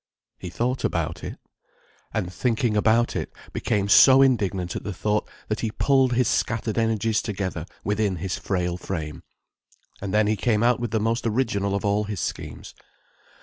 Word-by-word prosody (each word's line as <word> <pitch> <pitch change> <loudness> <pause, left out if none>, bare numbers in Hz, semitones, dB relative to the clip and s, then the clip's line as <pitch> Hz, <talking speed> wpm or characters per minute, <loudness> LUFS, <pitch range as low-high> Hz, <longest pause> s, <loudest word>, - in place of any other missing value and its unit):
He 90 - -6
thought 125 +8 -2
about 85 0 -2
it. - - -6 0.7
And 90 -5 -3
thinking 115 -1 0
about 110 +3 +3
it, - - -3 0.2
became 100 -1 0
so 135 +6 +8
indignant 100 -9 +1
at - - -4
the 100 -2 -5
thought 105 0 -1 0.2
that 110 - -2
he 115 - -1
pulled 130 +2 +2
his 125 -1 +2
scattered 115 -2 0
energies 110 -1 +1
together 95 -5 -4 0.2
within 105 -1 0
his 90 +2 -3
frail 90 -2 -2
frame. 80 -5 -5 0.8
And 100 -1 -4
then 105 +1 +3
he 105 +1 +2
came 105 +1 +1
out 120 +1 +3
with 120 -1 -2
the 110 +1 0
most 115 +2 0
original 105 -4 0
of 100 - -2
all 105 +1 +1
his 105 -3 -4
schemes. - - -5
105 Hz, 170 wpm, -24 LUFS, 95-115 Hz, 0.8 s, so